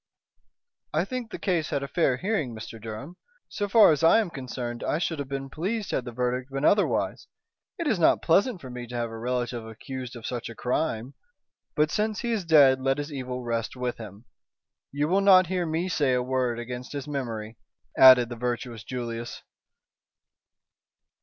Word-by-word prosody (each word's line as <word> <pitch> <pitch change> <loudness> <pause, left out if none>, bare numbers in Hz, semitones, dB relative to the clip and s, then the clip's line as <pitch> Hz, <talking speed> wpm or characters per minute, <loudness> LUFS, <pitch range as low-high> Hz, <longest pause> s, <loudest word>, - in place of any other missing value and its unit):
"I 160 +4 +2
think 250 +1 -5
the - - -6
case 170 -5 -1
had 140 -1 -1
a - - -4
fair 140 -4 +1
hearing, 160 - -2
Mr. 110 0 -9
Durham. 115 +11 -8 0.3
So 205 -1 -3
far 215 -4 +7
as 155 +1 0
I 165 - +7
am 205 -6 -1
concerned 125 -3 -5
I - - 0
should 165 -2 -2
have 140 - -4
been 135 0 -4
pleased 200 +5 -3
had 125 - -1
the 120 - -6
verdict 125 +2 -2
been 135 +2 -2
otherwise. 205 0 +1 0.5
It 335 - -3
is 225 - +1
not 165 - +4
pleasant 190 +4 +2
for 130 - -9
me 125 -1 -7
to 120 - -8
have 120 -1 -2
a 115 - -7
relative 120 0 -2
accused 125 +3 -7
of 115 - -9
such 120 -2 -4
a 115 - -9
crime. 125 -1 -2 0.6
But 150 -1 +2
since 215 0 -1
he 235 - -2
is 220 -4 0
dead 140 -5 +6
let 135 +1 +1
his 145 +1 -5
evil 125 -2 -5
rest 115 -1 -2
with 125 -1 -3
him. 105 0 -10 0.7
You 145 +2 0
will 190 +4 +2
not 190 -2 +7
hear 180 -2 0
me 165 +3 -1
say 145 -7 +1
a 125 - 0
word 125 -2 0
against 125 +2 -6
his 140 -1 -5
memory," 115 -6 -4 0.4
added 130 -2 +8
the 120 - -5
virtuous 120 -1 -4
Julius. 120 -2 -5
130 Hz, 190 wpm, -26 LUFS, 120-165 Hz, 0.7 s, added